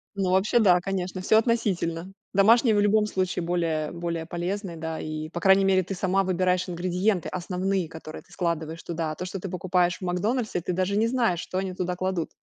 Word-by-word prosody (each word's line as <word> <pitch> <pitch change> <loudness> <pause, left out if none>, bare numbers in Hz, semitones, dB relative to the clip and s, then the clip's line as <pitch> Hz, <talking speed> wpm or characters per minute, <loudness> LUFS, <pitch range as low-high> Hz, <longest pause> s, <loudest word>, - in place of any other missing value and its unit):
Ну, 190 -2 0
вообще, 200 +6 +3
да, 185 -5 +5
конечно. 185 -1 -3
Всё 220 +4 +4
относительно. 195 -7 0 0.2
Домашние 220 +3 +5
в 205 - +3
любом 210 +1 +3
случае 185 -3 -1
более 165 -3 -1
более 170 -1 -4
полезные, 175 +1 -4
да 160 0 -4
и, 155 0 -5
по 170 - -5
крайней 195 +1 +5
мере, 190 -1 +4
ты 190 +2 -5
сама 190 +1 +1
выбираешь 185 -1 +1
ингредиенты 180 +2 0
основные, 185 0 -2
которые 160 -1 -9
ты - - -26
складываешь 165 -2 -3
туда. 160 -2 -3
То, 180 - -5
что 190 +1 -5
ты 195 - -6
покупаешь 180 -1 +1
в - - -27
"Макдональдсе", 195 +3 -1
ты 180 - -2
даже 185 +3 0
не 220 +2 +3
знаешь, 230 -8 +1
что 185 - -5
они 190 -1 -2
туда 180 0 -2
кладут. 185 -2 -2
185 Hz, 200 wpm, -26 LUFS, 170-195 Hz, 0.2 s, да